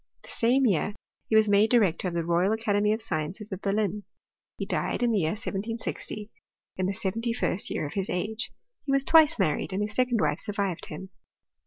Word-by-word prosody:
The - - -13
same 255 +4 +2
year 205 -1 +1 0.3
he 220 - +2
wag 220 0 +6
made 205 +2 +4
director 200 -7 +3
of 175 - -4
the 170 -1 -1
Royal 175 +4 +2
Academy 210 -2 +1
of 220 +1 -1
Sciences 175 +7 -4
of 190 0 -5
Berlin. 205 0 -1 0.5
He - - -3
died - - -1
in 240 - +3
the 215 - +2
year 160 -2 0
1760, 215 0 -5 0.4
in 185 0 -1
the - - 0
seventy 225 +3 -2
firet 200 -5 0
year - - -2
of 145 - -6
his 195 -1 -2
age. 210 +5 -2 0.3
He 280 - -2
was 275 0 +4
twice 320 +1 +6
mamed, 155 +5 0
and 200 +2 0
his 210 0 -3
secon4 250 -2 +2
wife - - +1
survived 200 -4 -2
him. 190 +5 -8
210 Hz, 200 wpm, -27 LUFS, 190-225 Hz, 0.5 s, wag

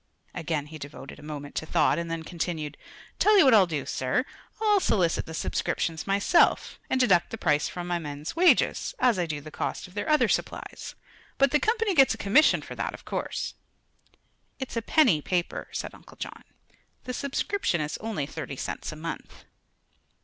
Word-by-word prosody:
Again 155 -2 -2
he 155 +1 -10
devoted 140 -1 -9
a - - -12
moment 145 -1 -7
to 160 - -3
thought, - - +3
and 170 0 -4
then 165 -1 -3
continued: 160 -3 -4 0.4
"Tell 425 0 +5
you 380 - +7
what 260 - +6
I'll 200 -4 +7
do, 155 -5 -3
sir; 130 - 0 0.3
I'll 420 -2 +4
solicit 180 - +1
the 160 - -6
subscriptions 160 0 -2
myself, 200 - +3
and 260 - +1
deduct 195 -9 +4
the 225 - -5
price 150 -7 +2
from 175 -1 -6
the 175 -1 0
men's 145 -1 -6
wages, 360 +7 +3
as 240 - +3
I 175 - 0
do 150 -2 -4
the 155 +1 -10
cost - - -3
of 180 - -17
their 205 +10 -3
other 305 0 +4
supplies. - - -3 0.4
But 275 -1 +4
the 300 - +4
Company 445 0 +1
gets 270 -7 +5
a - - -14
commission 215 +10 +4
for - - -8
that, - - -3
of - - -15
course." - - -3 1.0
"It's 265 -2 -6
a 230 - 0
penny 225 - +4
paper," 175 +2 -2
said - - -4
Uncle - - -16
John. - - -7 0.6
"The 250 - -5
subscription 280 - -1
is 150 0 -3
only 215 -10 -3
thirty 150 -1 -6
cents - - -4
a - - -8
month." 165 +2 -7
175 Hz, 185 wpm, -27 LUFS, -, 1.0 s, you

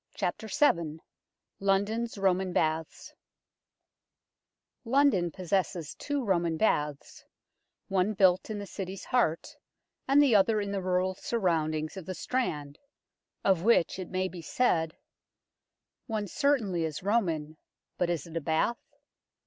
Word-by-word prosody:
VII 180 - +1 0.6
LONDON'S 205 +4 0
ROMAN 190 -1 +1
BATHS 160 -1 -1 1.7
LONDON 250 -8 +3
possesses 180 -2 -2
two 285 -2 -3
Roman 170 -4 +1
baths, 150 -7 -1 0.6
one 195 +2 +1
built 185 0 +3
in 215 - -3
the 205 - -5
City's 190 -1 -6
heart 200 -10 0 0.5
and 275 +2 +5
the 285 -5 +5
other 210 +2 +4
in 200 -1 -3
the 200 -1 -2
rural 185 0 +1
surroundings 160 -7 -1
of 185 - -8
the 185 - -4
Strand, 150 - -3 0.6
of 190 -4 +3
which 195 -3 +3
it 185 - -6
may 185 0 -1
be 180 -2 -8
said 165 -5 0 1.1
One 215 -3 -2
certainly 210 - +1
is 160 +1 -4
Roman, 165 -8 0 0.4
but 180 - +1
is 170 -5 -2
it 165 -1 -11
a 165 - -1
bath 160 +10 0
185 Hz, 125 wpm, -29 LUFS, 165-215 Hz, 1.7 s, and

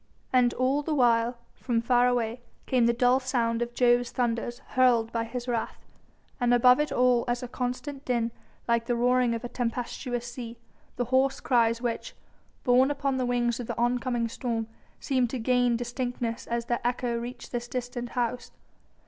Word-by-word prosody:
And 250 -1 +4
all 265 +3 +1
the 305 +1 -2
while, 240 -2 +3 0.2
from 240 -3 -1
far 245 +1 +3
away, 240 -1 -1 0.2
came 245 -3 +3
the - - +5
dull 245 +2 +3
sound 235 -3 0
of 240 0 -3
Jove's 245 -1 +3
thunders 240 -1 -1
hurled 240 -3 +3
by 230 -1 -1
his 245 +2 -6
wrath, 235 -2 -3 0.5
and 245 -1 +3
above 250 +2 +6
it 300 - 0 0.4
as 240 +1 -1
a - - -4
constant 255 +3 -4
din, 235 -3 0 0.4
like 235 -1 +1
the 240 - +1
roaring 245 0 +2
of 230 - -6
a - - -3
tempestuous 245 0 -3
sea, 240 -1 -7 0.4
the 245 - -1
hoarse 265 +1 +3
cries 235 -1 +2
which 235 -2 -3 0.5
borne 255 +1 +4
upon 275 -2 -1
the 255 -1 0
wings 240 -1 0
of 240 - -5
the - - -4
oncoming 240 0 0
storm 230 -1 -3 0.3
seemed 255 -4 +1
to 260 - -3
gain 245 0 +2
distinctness 245 -1 -3
as 235 0 -2
their 240 0 -1
echo 245 0 -1
reached 240 +1 -8
this 240 -1 -3
distant 245 -1 -4
house. 245 0 -1
245 Hz, 175 wpm, -27 LUFS, 235-250 Hz, 0.5 s, above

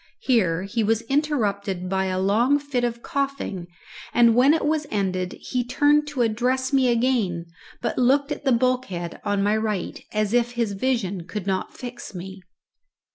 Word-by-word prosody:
Here 185 -9 +2
he 220 +3 -1
was 225 +2 +1
interrupted 210 - -1
by 190 +1 0
a 185 -1 -1
long 225 +9 +3
fit 285 -4 -2
of 235 -1 -2
coughing, 275 -10 -3 0.5
and 235 -1 +6
when 255 +5 +5
it 320 - -1
was 305 0 0
ended 185 -3 -1
he 250 -1 -2
turned 290 +4 +3
to 280 -4 0
address 250 +4 0
me 265 -2 +4
again, 230 -8 +1 0.4
but - - -1
looked 275 +4 +3
at - - -4
the 270 - +2
bulkhead 235 -8 0
on 205 -1 0
my 205 +1 +2
right, 215 -4 -2
as 215 0 0
if 240 0 +2
his 235 -3 -1
vision 200 -5 -1
could 190 +2 -5
not 190 -1 -2
fix 240 -4 -8
me. 190 +2 -8
235 Hz, 170 wpm, -24 LUFS, 195-260 Hz, 0.5 s, and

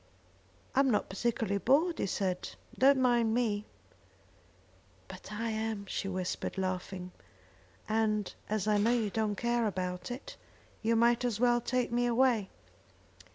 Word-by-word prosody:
"I'm 270 0 +4
not 210 - +1
particularly 200 0 -1
bored," 315 - +3
he - - 0
said; 185 -1 -2 0.2
"don't 275 +1 +5
mind 240 -3 +3
me." 215 -4 0 1.4
"But - - -10
I 225 +2 -2
am," 220 -2 -3
she 195 - -3
whispered, 185 0 -3
laughing, 185 -1 -3 0.8
"and 215 -2 0 0.2
as 215 -1 -1
I 210 -1 +3
know 225 +4 +3
you 220 -4 0
don't 215 -1 0
care 235 0 +1
about 180 -2 -3
it, 245 +3 -7 0.4
you 230 +1 +2
might 235 +1 +3
as 235 -4 -1
well 240 0 +3
take 250 0 -1
me 245 +1 +1
away." 235 -4 +2
220 Hz, 140 wpm, -31 LUFS, 200-240 Hz, 1.4 s, don't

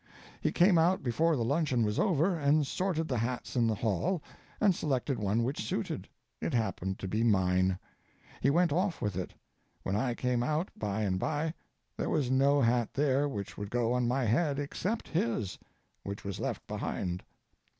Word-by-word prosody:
He - - +1
came 175 -1 +5
out 175 +2 +3
before 155 +7 +2
the 120 - 0
luncheon 135 -3 +1
was 105 0 0
over, 180 -1 +3
and 150 -1 +3
sorted 165 +1 -1
the 125 -5 0
hats 120 +3 -3
in 120 -2 +3
the 110 - +1
hall, 120 - 0 0.4
and 205 -3 +5
selected 135 -5 -1
one 105 +3 +1
which 130 +1 -2
suited. - - -3 0.3
It - - -1
happened 95 -4 -1
to 95 - -5
be 110 +4 0
mine. 95 -3 +3 0.6
He 135 - +4
went 170 +1 +3
off 180 +1 0
with 105 -3 -2
it. 90 -1 -4 0.5
When 95 - -1
I 120 +3 0
came 125 -1 0
out 155 +8 0
by 105 0 -2
and 95 -2 0
by 155 +7 -1 0.4
there - - -1
was 140 -6 +1
no 140 +2 +4
hat 120 -1 +2
there 145 0 +2
which 100 -6 -5
would 100 -1 -4
go 120 +1 +1
on 125 -1 +1
my 130 +2 +1
head 140 +6 +2
except 185 +10 -2
his, 115 - -1 0.4
which 100 +1 -6
was 100 -1 -4
left - - -3
behind. 90 0 -3
125 Hz, 180 wpm, -31 LUFS, 110-155 Hz, 0.6 s, came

